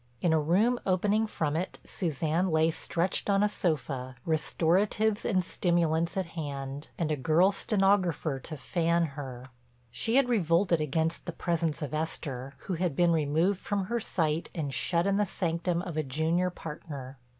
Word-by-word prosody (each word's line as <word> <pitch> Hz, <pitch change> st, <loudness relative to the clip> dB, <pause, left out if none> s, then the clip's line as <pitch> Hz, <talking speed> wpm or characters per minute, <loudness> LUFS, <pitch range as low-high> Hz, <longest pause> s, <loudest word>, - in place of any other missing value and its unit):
In 170 Hz, -2 st, +2 dB
a 160 Hz, -, +4 dB
room 205 Hz, +11 st, +2 dB
opening 205 Hz, +4 st, +2 dB
from 155 Hz, -7 st, -2 dB
it 175 Hz, +3 st, -2 dB
Suzanne 165 Hz, +2 st, 0 dB
lay 160 Hz, 0 st, +3 dB
stretched 175 Hz, +5 st, -1 dB
on 200 Hz, 0 st, +4 dB
a -, -, +5 dB
sofa, 135 Hz, -, -2 dB
restoratives 195 Hz, +7 st, +1 dB
and 185 Hz, -4 st, +2 dB
stimulants 170 Hz, -1 st, +1 dB
at 190 Hz, -, 0 dB
hand, 140 Hz, -3 st, -5 dB
and 160 Hz, -3 st, -1 dB
a -, -, +2 dB
girl 165 Hz, +7 st, +3 dB
stenographer 195 Hz, -8 st, +1 dB
to 155 Hz, +4 st, -7 dB
fan 170 Hz, +3 st, +1 dB
her. 130 Hz, -4 st, -7 dB, 0.5 s
She 225 Hz, -, 0 dB
had 270 Hz, -1 st, +5 dB
revolted 175 Hz, -6 st, +2 dB
against 160 Hz, +4 st, -1 dB
the -, -, -1 dB
presence 165 Hz, -2 st, -1 dB
of 145 Hz, 0 st, -5 dB
Esther, 140 Hz, -4 st, -3 dB
who 195 Hz, -, -2 dB
had 175 Hz, -3 st, -1 dB
been 175 Hz, +1 st, +4 dB
removed 165 Hz, +5 st, +2 dB
from 200 Hz, -1 st, -1 dB
her 235 Hz, +5 st, -1 dB
sight 165 Hz, -6 st, -1 dB
and 145 Hz, -5 st, -3 dB
shut 170 Hz, +4 st, +1 dB
in 200 Hz, 0 st, +2 dB
the 210 Hz, -, +3 dB
sanctum 170 Hz, 0 st, -1 dB
of 175 Hz, -5 st, -5 dB
a -, -, +3 dB
junior 160 Hz, +6 st, 0 dB
partner. 145 Hz, -6 st, -8 dB
165 Hz, 165 wpm, -29 LUFS, 155-185 Hz, 0.5 s, a